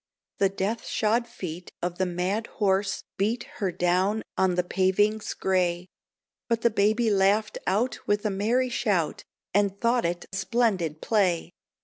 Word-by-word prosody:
The 195 Hz, -, +4 dB
death 195 Hz, +4 st, -3 dB
shod 230 Hz, +2 st, +1 dB
feet 180 Hz, -7 st, -7 dB
of 175 Hz, 0 st, -3 dB
the 185 Hz, -, +2 dB
mad 185 Hz, +6 st, -1 dB
horse 195 Hz, -1 st, 0 dB, 0.2 s
beat 225 Hz, +5 st, +1 dB, 0.2 s
Her 190 Hz, -2 st, +1 dB
down 185 Hz, +5 st, +1 dB
on 185 Hz, -1 st, +2 dB
the 180 Hz, -, +2 dB
pavings 195 Hz, +4 st, +1 dB
grey; 180 Hz, -1 st, 0 dB, 0.6 s
But 230 Hz, -1 st, +1 dB
the 235 Hz, -, +3 dB
baby 215 Hz, +2 st, +2 dB
laughed 205 Hz, +2 st, +2 dB
out 220 Hz, +7 st, +1 dB
with 205 Hz, +1 st, +1 dB
a 210 Hz, -, +1 dB
merry 230 Hz, +6 st, +1 dB
shout, 205 Hz, -9 st, 0 dB, 0.3 s
And 200 Hz, 0 st, +1 dB
thought 235 Hz, -1 st, +2 dB
it 175 Hz, +1 st, -2 dB
splendid 190 Hz, -6 st, 0 dB
play. 190 Hz, -6 st, +1 dB
200 Hz, 145 wpm, -26 LUFS, 185-220 Hz, 0.6 s, The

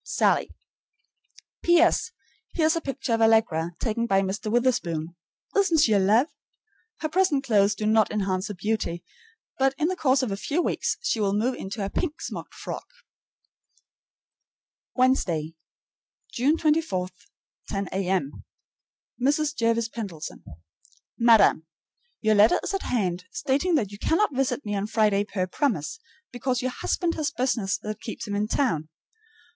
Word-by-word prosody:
SALLIE. 440 Hz, -, +1 dB, 1.1 s
P.S. 345 Hz, +3 st, +4 dB, 0.5 s
Here 320 Hz, -, +2 dB
is 320 Hz, +2 st, +3 dB
a 330 Hz, -, -1 dB
picture 270 Hz, -4 st, -3 dB
of 225 Hz, -, +1 dB
Allegra, 220 Hz, -7 st, +3 dB
taken 230 Hz, +1 st, -1 dB
by 195 Hz, -3 st, +3 dB
Mr. 205 Hz, +3 st, -3 dB
Witherspoon. 185 Hz, -10 st, 0 dB, 0.4 s
Isn't 390 Hz, -5 st, +3 dB
she 235 Hz, -7 st, +4 dB
a 200 Hz, -, +4 dB
love? 215 Hz, +7 st, +4 dB, 0.8 s
Her 310 Hz, -, 0 dB
present 320 Hz, -5 st, +2 dB
clothes 205 Hz, -5 st, +3 dB
do 215 Hz, -, -4 dB
not 215 Hz, 0 st, +4 dB
enhance 195 Hz, -2 st, -1 dB
her 205 Hz, -, -6 dB
beauty, 180 Hz, -3 st, -2 dB, 0.6 s
but 270 Hz, 0 st, +2 dB
in 310 Hz, +3 st, +1 dB
the 370 Hz, -, -1 dB
course 265 Hz, -5 st, +2 dB
of 240 Hz, -, -2 dB
a 195 Hz, -, -2 dB
few 290 Hz, +10 st, -2 dB
weeks -, -, 0 dB
she 480 Hz, -, 0 dB
will 200 Hz, -1 st, +1 dB
move 235 Hz, +5 st, +1 dB
into 200 Hz, -2 st, -5 dB
a -, -, -3 dB
pink 330 Hz, -3 st, -2 dB
smocked -, -, -7 dB
frock. -, -, -6 dB, 2.1 s
Wednesday, 180 Hz, -, +1 dB, 0.8 s
June 280 Hz, +7 st, +2 dB
24, 300 Hz, -, +1 dB, 0.6 s
10 195 Hz, -1 st, -3 dB
A.M. 185 Hz, -6 st, -2 dB, 0.8 s
MRS. 295 Hz, +3 st, +1 dB
JERVIS 230 Hz, -1 st, +1 dB
PENDLETON. 200 Hz, -10 st, -7 dB, 0.8 s
Madam: 225 Hz, -8 st, +5 dB, 0.5 s
Your 215 Hz, -1 st, +3 dB
letter 210 Hz, +2 st, +5 dB
is -, -, -3 dB
at 390 Hz, -, -1 dB
hand, 185 Hz, -7 st, -1 dB
stating 280 Hz, -, 0 dB
that 215 Hz, -9 st, 0 dB
you 205 Hz, -, -10 dB
cannot 330 Hz, -, +1 dB
visit 270 Hz, 0 st, -1 dB
me 205 Hz, -, -3 dB
on 200 Hz, 0 st, -1 dB
Friday 210 Hz, -2 st, +2 dB
per 185 Hz, -3 st, -2 dB
promise, 225 Hz, -, -2 dB, 0.3 s
because 245 Hz, +1 st, -2 dB
your 255 Hz, -, -1 dB
husband 340 Hz, +6 st, -1 dB
has 305 Hz, -3 st, -1 dB
business 235 Hz, -8 st, -1 dB
that 215 Hz, 0 st, -6 dB
keeps 220 Hz, -, -6 dB
him 205 Hz, -, -4 dB
in 205 Hz, +1 st, 0 dB
town. 165 Hz, -, 0 dB
225 Hz, 150 wpm, -25 LUFS, 195-275 Hz, 2.1 s, Madam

